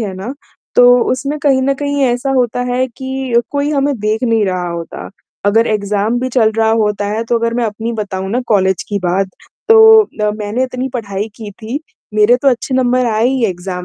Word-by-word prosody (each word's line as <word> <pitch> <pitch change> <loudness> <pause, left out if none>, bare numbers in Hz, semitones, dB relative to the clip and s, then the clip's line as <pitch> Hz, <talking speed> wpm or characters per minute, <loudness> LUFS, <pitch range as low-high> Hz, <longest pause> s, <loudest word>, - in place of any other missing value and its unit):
है 205 -4 -3
ना, 200 +8 -6 0.4
तो 245 - +6 0.3
उसमें 275 +4 -3
कहीं 270 -3 +3
न 275 +1 +1
कहीं 285 0 -2
ऐसा 245 +2 -1
होता 245 -2 0
है 255 +1 +1
कि 260 -1 -2
कोई 285 +1 -1
हमें 285 -1 +1
देख 215 +3 -1
नहीं 225 -3 +2
रहा 180 -1 -2
होता, 170 -1 -7 0.4
अगर 225 +3 +3
एग्ज़ाम 210 +2 0
भी 255 - -1
चल 235 -3 +2
रहा 220 0 +3
होता 205 -1 -1
है 215 +3 -2
तो 235 +1 0
अगर 230 0 -1
मैं 245 - 0
अपनी 225 +2 -3
बताऊँ 195 -4 -4
ना 245 +4 0
कॉलेज 190 -4 +1
की 205 - -1
बात 190 +2 0 0.4
तो 445 0 +8
अ, 210 - -3
मैंने 215 +3 -2
इतनी 255 0 -4
पढ़ाई 205 -2 -3
की 215 -2 -8
थी, 220 +6 -6 0.4
मेरे 215 +3 +4
तो 280 - +4
अच्छे 255 +1 -1
नंबर 255 -1 +2
आए 220 +2 +2
ही 260 -3 0
एग्ज़ाम 180 -1 -5
230 Hz, 205 wpm, -15 LUFS, 205-260 Hz, 0.4 s, तो